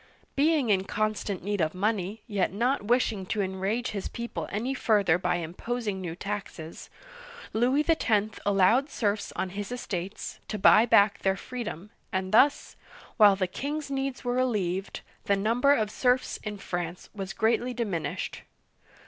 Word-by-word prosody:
Being 290 -5 +3
in 190 -1 +2
constant 210 -2 -2
need 205 -1 -1
of 155 +2 0
money, 205 +1 -1
yet 205 -5 0
not 245 +8 +1
wishing 220 -2 +1
to 210 - -1
enrage 195 +6 -2
his 200 -2 -4
people 235 0 -5
any 235 +6 -1
further 205 -9 +2
by 180 -1 0
imposing 190 +5 -3
new 170 -3 -5
taxes, 195 -5 -6 0.6
Louis 255 +7 +2
X. 220 -10 +1
allowed 205 +8 +3
serfs 210 -5 -1
on 190 - -2
his 205 +3 -5
estates 195 -6 -5
to 215 - -3
buy 210 +3 +6
back 200 -2 +5
their 195 0 +1
freedom, 215 -6 -6 0.2
and 190 -1 -2
thus, 280 +6 +4 0.4
while 205 -3 +7
the 190 -1 0
king's 280 +9 -4
needs 270 -1 -2
were 245 -1 -1
relieved, 200 -7 -1 0.2
the 200 - +3
number 230 +7 +2
of 215 -7 +2
s'erfs 250 +2 +1
in 210 -1 -4
France 175 -2 -5
was 195 -2 -5
greatly 235 +3 +1
diminished. 215 -9 -3
210 Hz, 150 wpm, -28 LUFS, 190-245 Hz, 0.6 s, while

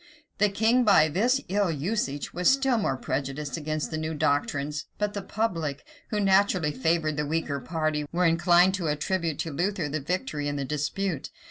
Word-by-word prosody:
The 210 0 +4
king, 225 +5 +3
by 195 -8 +5
this 245 - +2
ill 200 -1 +1
usage, 150 -2 -2
was 180 +1 +3
still 270 -3 +3
more 135 -10 0
prejudiced 140 +2 -3
against 155 -1 -3
the 155 - -2
new 155 0 -3
doctrines; 145 0 -1
but 210 0 -1
the 200 - -3
public, 165 -10 -2 0.2
who 210 - -1
naturally 190 -5 +3
favor 155 +3 +1
the 150 0 -2
weaker 150 -2 -1
party, 155 +2 -2
were 180 +1 +1
inclined 175 +2 +4
to 185 -4 -2
attribute 160 +1 -1
to 160 - -4
Luther 180 +1 -1
the 155 +1 -2
victory 150 - -2
in 145 - -2
the 140 -1 -2
dispute. 150 +3 -2
165 Hz, 175 wpm, -27 LUFS, 150-195 Hz, 0.2 s, by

